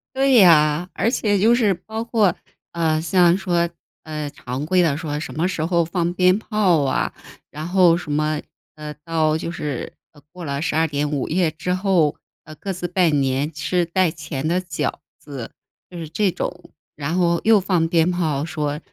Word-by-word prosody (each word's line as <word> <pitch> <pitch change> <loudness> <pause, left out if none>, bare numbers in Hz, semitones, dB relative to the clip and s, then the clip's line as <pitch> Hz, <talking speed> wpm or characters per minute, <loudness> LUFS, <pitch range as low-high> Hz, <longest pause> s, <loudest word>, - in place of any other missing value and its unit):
对 270 0 +3
呀。 170 -4 +5
而 225 - +1
且 205 -5 +1
就 225 +4 +5
是 220 -5 +2
包 220 +5 -6
括， 215 -6 +2 0.4
呃， 160 -2 0
像 175 +1 +4
说， 175 -3 0 0.3
呃， 150 -2 -5
常 135 0 -6
规 180 +2 +3
的 155 -5 +1
说 150 -2 -4
什 155 - -6
么 165 +3 +1
时 185 -4 -2
候 170 -1 +2
放 175 0 -1
鞭 185 +1 +4
炮 205 -8 +1
啊， 135 -1 -1 0.4
然 155 +2 -6
后 175 -2 +4
什 165 -4 -6
么， 150 0 0 0.3
呃， 150 -1 -7
到 160 -2 +1
就 165 - -4
是， 150 -6 -5 0.4
过 180 -1 -10
了 140 -1 -3
12 160 0 +1
点 145 0 -2
午 140 -3 -2
夜 170 0 +1
之 180 +3 -3
后， 185 -5 +2 0.3
呃， 155 - -12
各 195 +4 -5
自 175 -1 -4
拜 180 -1 +2
年 140 0 0
吃 170 +3 -1
带 175 0 +1
钱 150 -2 -5
的 175 +3 +1
饺 170 -5 -3 0.2
子， 135 -6 -8 0.4
就 180 - -10
是 160 -2 -6
这 190 +3 +1
种。 180 +2 -6 0.3
然 150 +4 -2
后 170 -1 +2
又 220 -2 +5
放 180 -4 +1
鞭 165 +1 +2
炮， 155 -5 -1
说， 150 -2 -3
170 Hz, 195 characters per minute, -21 LUFS, 150-180 Hz, 0.4 s, 呀